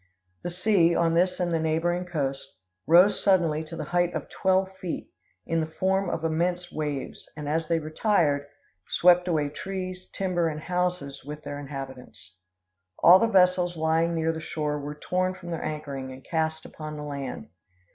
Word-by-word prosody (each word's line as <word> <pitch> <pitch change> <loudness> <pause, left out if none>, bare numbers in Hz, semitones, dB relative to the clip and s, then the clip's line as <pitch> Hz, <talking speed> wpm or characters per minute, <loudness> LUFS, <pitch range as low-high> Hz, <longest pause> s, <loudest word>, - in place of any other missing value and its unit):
The - - -3
sea, 175 -2 +3
on 165 -1 +2
this 180 +2 +2
and 175 -1 0
the 165 - +2
neighboring 165 +3 0
coast, 140 -6 -3 0.3
rose 180 +5 +6
suddenly 165 -5 +3
to 165 - -8
the - - -4
height 175 0 +2
of - - -4
twelve 190 0 +1
feet, 175 -3 -5 0.3
in 165 0 0
the 160 - -1
form 190 0 +2
of 165 - -3
immense 175 +2 0
waves, 150 -3 -4
and, 150 -1 -5
as 160 +2 0
they 165 0 +2
retired, 155 -3 +1 0.4
swept 180 0 +4
away 155 -4 +1
trees, 185 +2 -6
timber, 180 -3 0
and 155 -1 -3
houses 180 -6 -2
with 150 +2 -8
their 145 - -5
inhabitants. 130 - -9 0.6
All 180 +3 +8
the 230 - +3
vessels 180 -4 +3
lying 160 +1 +1
near 160 0 +1
the 160 0 -6
shore 150 -1 -2
were 145 +1 -6
torn 185 +4 -1
from 175 -2 -9
their 165 - -3
anchoring 140 -4 -5
and 130 0 -11
cast 160 -1 -1
upon 155 -1 -7
the 150 - -6
land. 140 - -5
165 Hz, 175 wpm, -26 LUFS, 150-180 Hz, 0.6 s, All